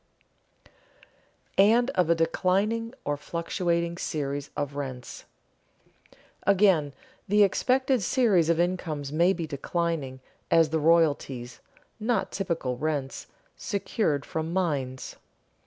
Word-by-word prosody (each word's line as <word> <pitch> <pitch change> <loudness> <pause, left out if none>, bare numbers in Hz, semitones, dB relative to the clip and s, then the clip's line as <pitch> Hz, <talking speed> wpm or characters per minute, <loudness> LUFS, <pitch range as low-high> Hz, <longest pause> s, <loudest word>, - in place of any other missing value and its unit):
[Sidenote: - - -24 1.1
And 245 +1 +1
of 180 -3 +1
a 170 - +5
declining 200 +8 0
or 145 0 -1
fluctuating 170 +2 -2
series 145 -2 -3
of 145 -1 -3
rents] 130 -3 -6 1.2
Again 185 -8 +3 0.3
the 210 +1 +5
expected 255 +5 +2
series 195 - +3
of 170 0 +2
incomes 165 -5 -1
may 170 +4 +3
be 170 -4 -2
declining, 150 -2 -3 0.3
as 165 -2 +4
the 160 - +1
royalties 145 -6 +1 0.4
(not 220 -2 0
typical 165 -10 -2
rents) 145 -3 -3 0.3
secured 200 - -1
from 160 +1 -3
mines. 145 -8 -2
165 Hz, 105 wpm, -27 LUFS, 145-190 Hz, 1.2 s, a